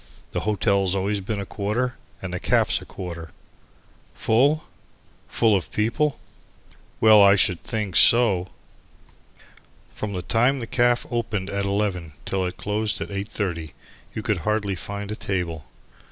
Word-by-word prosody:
The - - -2
hotel's 100 -2 +2
always 100 +1 -1
been 105 +2 -3
a 100 - -4
quarter 110 +7 -2 0.3
and 90 -2 -5
the 90 - -2
caff's - - +2
a - - -10
quarter." 85 -3 -7 0.9
Full? 140 +8 +2 0.6
Full 110 -3 +2
of 95 - -2
people? 135 +7 0 0.8
Well, 110 -1 +7
I 100 0 +7
should 90 -3 +2
think 105 -6 -3
so! 105 -7 +5 1.4
From 105 -1 -5
the 90 -2 -4
time 125 +7 +2
the 115 - -2
caff 120 +1 +2
opened 105 -5 -2
at 100 0 -1
11 100 -5 -1
till 95 -1 -1
it 90 - -7
closed 105 +2 -1
at - - -5
8.30, 95 -6 -4 0.4
you 110 - -4
could 105 -2 0
hardly 105 +3 -1
find 100 +3 -5
a - - -3
table. 85 -7 -3
100 Hz, 145 wpm, -24 LUFS, 95-110 Hz, 1.4 s, Well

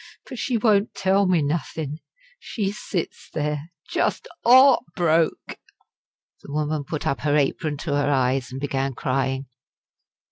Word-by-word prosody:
But 255 - -7
she 250 -3 0
won't 210 -2 +2
tell 195 +1 +2
me 175 -4 +3
nothin'. 150 0 -3 0.4
She 200 -4 -3
sits 190 -4 -5
there 150 +1 -3 0.2
just - - -1 0.2
heart 260 +2 +7
broke" 165 -1 +1 0.8
the - - -11
woman 150 0 -1
put 155 +1 -4
up 140 - 0
her 150 -1 +1
apron 145 +1 0
to 150 0 -3
her 145 0 +1
eyes 130 -2 +1
and 130 - -5
began 135 -1 -2
crying. 135 +1 -1
150 Hz, 140 wpm, -23 LUFS, 140-190 Hz, 0.8 s, heart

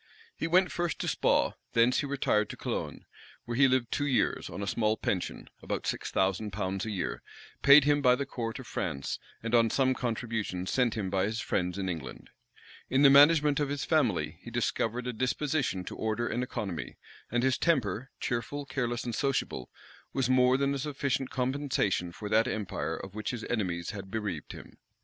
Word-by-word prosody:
He - - -2
went 180 +2 +4
first 175 -1 -1
to - - -2
Spaw, - - +2 0.2
thence 120 +2 +4
he 145 - -1
retired 120 -6 +1
to - - -7
Cologne; - - -4 0.4
where 120 - -3
he 135 +2 +6
lived 130 -2 +1
two 145 - 0
years, 130 - +1
on 100 - -5
a - - -1
small 110 +1 +1
pension, 90 -3 -3
about - - -3
six - - -2
thousand 95 +3 0
pounds 95 +1 -2
a - - -2
year, 95 -4 -3 0.4
paid 140 +1 +8
him 145 0 +3
by 125 -2 +5
the 140 +2 -3
court 115 -4 -4
of 130 - -9
France, 70 -11 -3 0.2
and 115 0 -3
on 115 -1 +5
some 130 +2 +2
contributions 110 -7 -3
sent 125 -3 +2
him 100 -4 -3
by 95 -1 +2
his 110 +2 -2
friends 90 -3 -1
in 95 -1 -2
England. 80 -7 -6 0.6
In 135 +2 +3
the 140 - +8
management 145 0 +6
of 145 -2 0
his 145 -1 -2
family - - +1
he - - -9
discovered 120 +2 -1
a 125 - -2
disposition 130 -3 -1
to - - -6
order 110 +2 -1
and 120 - -1
economy; 95 -9 -4 0.3
and 120 +1 +1
his 130 0 +2
temper, 130 - +1
cheerful, 140 +4 -3
careless, 120 -3 -2
and 120 - -4
sociable, 125 - -1 0.4
was 135 -3 +1
more 130 0 +4
than 140 0 +1
a 140 - -2
sufficient 140 -2 -1
compensation 125 -9 0
for 105 +4 -7
that 110 +3 +3
empire 105 -7 -3
of 95 - -8
which 105 0 -4
his 120 -3 -4
enemies 90 -7 -1
had 100 -2 -8
bereaved 100 -7 -4
him. - - -12
120 Hz, 190 wpm, -30 LUFS, 105-135 Hz, 0.6 s, paid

